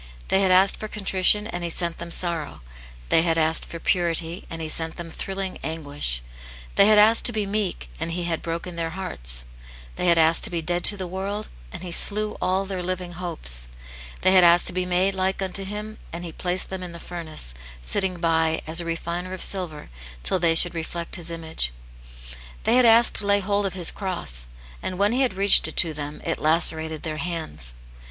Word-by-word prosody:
They 190 - +3
had 190 - +2
asked 185 +1 +5
for 215 - -6
contrition, 205 0 +3
and 175 -6 -6
he 170 - -3
sent 170 0 0
them 170 - -7
sorrow; 170 - +1 0.5
they - - +5
had 165 -1 +1
asked 160 0 +3
for 170 - -8
purity, 170 -1 -1
and 165 - -7
He 160 - -5
sent 160 +1 -2
them 170 -2 -8
thrilling 190 +1 -5
anguish; 145 - -2 0.5
they 200 - +5
had 215 0 +5
asked 220 +2 +5
to 245 - +7
be 215 -3 -2
meek, 200 - -3
and 165 - -4
He 175 +1 -3
had 170 -2 -3
broken 170 +1 -6
their 165 -1 -2
hearts; - - -1 0.5
they 180 - -1
had 170 -1 +4
asked 160 0 +5
to - - -1
be 175 - -3
dead 175 +2 -3
to 205 - +5
the 190 - -5
world, 195 +4 -5 0.2
and - - -9
He 180 - -7
slew 210 +4 +3
all 190 +2 0
their 190 -2 -5
living 180 0 -4
hopes; 155 - -2 0.5
they 185 - +4
had 185 -1 +6
asked 175 0 +5
to - - +2
be 180 0 -2
made 185 +2 +1
like 190 0 -1
unto 190 0 -3
Him, 210 +2 -7
and 170 +1 -7
He 170 - -7
placed 180 +3 -2
them 190 -1 -5
in 180 -2 -7
the 170 - -9
furnace, 160 - -1 0.3
sitting 185 - -1
by 160 -1 0
"as 165 +2 +1
a - - -7
refiner 170 +2 -4
of 185 - -3
silver," 170 - -3 0.3
till 190 - +1
they 165 -1 +2
should 175 +1 +6
reflect 170 +1 -4
His 170 -2 -2
image; 160 - +1 0.9
they - - +2
had 250 -1 +5
asked 230 +1 +5
to 205 - -2
lay 200 0 +3
hold 200 0 -1
of 190 - -7
His 175 -3 +4
cross, 115 - -1 0.3
and 185 - -4
when 200 +2 +2
He 250 +3 0
had 255 -7 0
reached 200 +1 +5
it - - -10
to 165 -3 +4
them, 145 0 -7
it - - -2
lacerated 160 0 +1
their 155 -1 -4
hands. 155 - -2
175 Hz, 210 wpm, -23 LUFS, 165-190 Hz, 0.9 s, to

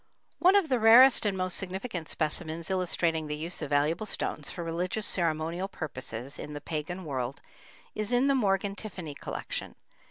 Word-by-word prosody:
One 370 +2 +6
of 395 -5 +4
the 255 -4 +1
rarest 230 +1 +8
and 195 -2 -1
most 185 -1 -1
significant 190 -2 -4
specimens 160 +2 -2
illustrating 170 -4 0
the 150 0 -3
use 165 +4 -5
of 150 - -4
valuable 150 +8 +1
stones 150 -6 -2
for 175 - -5
religious 180 +6 -2
ceremonial 170 +1 0
purposes 130 - -7
in 150 - -6
the 145 - -5
pagan 165 +4 -5
world 130 -2 -3 0.5
is 215 +2 -3
in 245 +2 +3
the 275 - +4
Morgan 200 -5 +1
Tiffany 185 -8 -6
collection. - - -5
175 Hz, 165 wpm, -29 LUFS, 155-205 Hz, 0.5 s, rarest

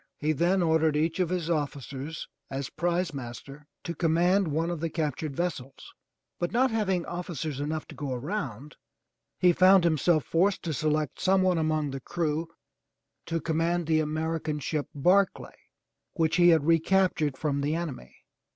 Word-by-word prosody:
He 150 +1 0
then 175 +5 +2
ordered 160 -2 +2
each 165 +3 0
of 180 -3 +1
his 180 -3 -2
officers 145 -1 -3 0.2
as 135 0 -4
prizemaster 150 -5 -3 0.2
to 170 - -4
command 175 +4 +2
one 160 +3 -1
of 170 - -4
the 165 +1 -2
cap 150 -4 -2
tured 155 -3 -4
vessels, 140 -6 -4 0.5
but 175 - -1
not 255 +2 +2
having 190 -6 0
officers 165 -5 -4
enough 155 +2 -3
to - - -9
go 145 -3 -5
around, 140 - -4 0.6
he 180 -1 +4
found 185 +1 +6
himself 160 -1 +2
forced 185 +4 +1
to 165 - -2
select 155 -1 -1
some 190 0 +3
one 180 -3 +2
among 155 -2 0
the 135 0 -6
crew 160 +1 -2 0.8
to 165 0 -1
com 160 0 -2
mand 170 +1 +1
the 160 0 +2
American 155 0 -2
ship 150 0 -2
Barclay 185 +7 +2 0.6
which 165 -1 +1
he 175 0 +6
had 160 -4 +4
recaptured 165 -3 +2
from 140 -1 -1
the 145 +3 0
enemy. 155 - -6
160 Hz, 160 wpm, -28 LUFS, 150-175 Hz, 0.8 s, found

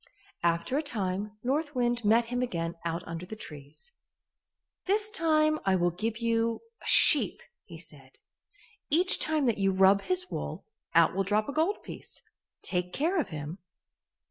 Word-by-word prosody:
After 170 - 0
a - - 0
time 205 -6 -3
North 290 +4 -1
Wind 240 -1 0
met 225 +3 +4
him 245 +1 -3
again 170 -8 -2
out 170 0 -3
under 165 +1 -6
the 220 - -7
trees. 150 - -11 1.0
"This 420 +2 +1
time 310 -5 +2
I 190 -1 +2
will 175 -1 +1
give 215 +5 -3
you 230 0 0 0.2
a - - -10
sheep," - - +5 0.3
he - - -11
said. - - -14 0.7
"Each 355 +5 +4
time 310 -3 +1
that 230 -4 +1
you 195 0 +2
rub 190 +1 +4
his 365 - -2
wool, - - -5 0.3
out - - +5
will 195 - +1
drop 210 +2 +1
a 280 - -4
gold 325 +7 0
piece. - - -9 0.4
Take 180 -1 -2
care 335 +6 0
of 290 - -2
him." 155 +2 -6
225 Hz, 165 wpm, -29 LUFS, 185-305 Hz, 1.0 s, sheep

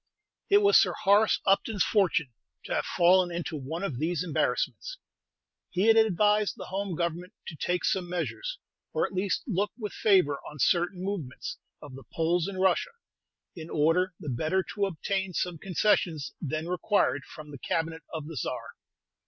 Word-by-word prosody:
It 405 0 +5
was 405 +1 +7
Sir - - +1
Horace 210 +1 +3
Upton's 200 +1 +2
fortune 170 - +1 0.3
to - - -4
have - - -1
fallen 180 +1 +4
into 170 -2 -4
one 155 +6 -5
of 140 -11 -3
these 165 +2 0
embarrassments. 180 - -1 0.7
He 185 - 0
had 225 0 +6
advised 210 -1 +3
the - - -7
Home 195 -2 -2
Government 170 +3 -3
to 165 - -7
take 180 +4 -1
some 180 -2 0
measures, - - -3 0.4
or - - +1
at - - -7
least 190 +1 -1
look 205 -3 0
with 210 -4 -5
favor 180 -9 +3
on 150 - -11
certain 175 +5 +1
movements 200 - -5 0.2
of 145 -3 -10
the 135 +1 -10
Poles 165 +1 +1
in 200 -1 -5
Russia, 190 - +2 0.6
in 165 -1 -8
order 165 +4 +2
the 150 - -6
better 155 +9 0
to 200 -1 0
obtain 190 +1 -3
some 175 -3 -2
concessions 175 -5 +1
then 155 +1 -3
required 180 -6 +1
from 150 +1 -11
the 140 - -9
Cabinet 165 +2 -2
of 160 -3 -5
the 160 -1 -8
Czar. - - -4
180 Hz, 170 wpm, -28 LUFS, 160-200 Hz, 0.7 s, was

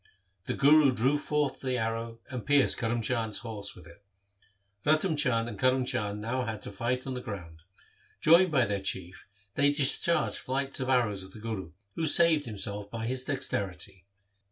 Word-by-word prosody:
The - - -1
Guru 145 0 +5
drew 130 +4 +1
forth 150 -1 -1
the 130 -2 -1
arrow 115 0 -3
and 125 -3 -5
pierced 145 -1 +3
Karm 115 0 -1
Chand's 110 -2 0
horse 110 -3 -3
with - - -14
it. 85 +3 -16 0.8
Ratan 155 +3 +2
Chand 125 -6 +1
and 105 -4 -7
Karm 130 0 +2
Chand 105 -3 -2
had 125 +1 -2
now 110 - -2
to - - -7
fight 125 +5 -2
on 135 - -4
the 125 - -5
ground. 90 -9 -8 0.6
Joined 170 +3 +5
by 130 -5 +3
their 100 -2 -2
Chief 95 -1 -4 0.3
they 140 +4 +3
discharged 145 +4 +2
flights 135 +2 -2
of 130 0 -3
arrows 115 -7 +1
at 95 - -13
the - - -11
Guru, 105 -7 -6 0.2
who 160 +5 -1
saved 160 -3 +5
himself 100 -1 -4
by 115 0 -5
his 130 +2 -3
dexterity. 95 -8 -4
120 Hz, 180 wpm, -29 LUFS, 105-140 Hz, 0.8 s, Guru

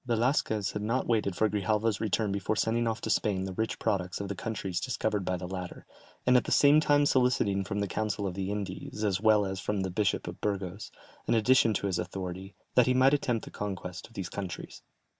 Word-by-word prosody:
Velasquez 115 -3 +1
had 105 - -4
not 115 +5 0
waited 105 -5 +1
for 110 - +3
Grijalva's 105 +1 0
return 110 -1 0
before 100 +2 -1
sending 115 +2 +1
off 115 0 -2
to - - -4
Spain 100 -3 +1
the 95 - -5
rich 110 +4 -2
products 95 -5 -1
of 100 -1 -4
the 100 - -3
countries 95 -3 -3
discovered 110 -3 -1
by 90 0 -1
the 90 0 -6
latter, 90 -1 -6 0.4
and 125 - +5
at 125 - +4
the - - -4
same 145 +1 +6
time 145 -1 +3
soliciting 125 -8 +2
from 100 +1 -3
the 100 - 0
council 105 +1 -2
of 95 - -2
the 95 +1 -3
Indies, 100 +1 -4
as 100 -3 +1
well 110 -2 +4
as 95 0 -4
from 100 +2 -1
the 95 -1 -2
Bishop 100 0 0
of - - -7
Burgos, 100 -1 -3 0.4
an - - +3
addition 115 -1 +4
to - - -1
his 95 -3 0
authority, 95 +1 -5 0.2
that 125 - +5
he 125 - +3
might 130 +2 +5
attempt 125 -6 0
the - - -10
conquest 95 -3 -5
of 115 - -22
these 95 -4 -4
countries. 95 -3 -6
105 Hz, 220 wpm, -29 LUFS, 95-115 Hz, 0.4 s, same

